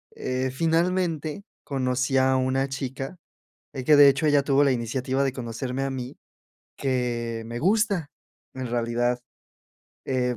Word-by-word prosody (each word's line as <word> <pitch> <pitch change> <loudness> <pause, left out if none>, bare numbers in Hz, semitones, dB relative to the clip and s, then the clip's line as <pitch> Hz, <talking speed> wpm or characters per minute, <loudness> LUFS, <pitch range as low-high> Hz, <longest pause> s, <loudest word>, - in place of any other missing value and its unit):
Eh, 130 +1 -2
finalmente, 165 +1 0 0.2
conocí 130 -1 0
a 130 0 +4
una 130 +1 0
chica 135 +4 -5 0.6
y 130 - -5
que 150 +4 +6
de 145 -1 +9
hecho, 140 +3 +1
ella 145 -1 +4
tuvo 140 0 +3
la 140 - +4
iniciativa 130 +3 -1
de 135 -2 0
conocerme 125 +1 -4
a 135 - -1
mí, 130 -1 -6 0.6
que 120 -3 -1
me 120 +1 -5
gusta, 195 - +1 0.5
en 130 -1 -4
realidad, 120 +1 0 0.9
eh, 125 -2 0
130 Hz, 140 wpm, -25 LUFS, 125-145 Hz, 0.9 s, de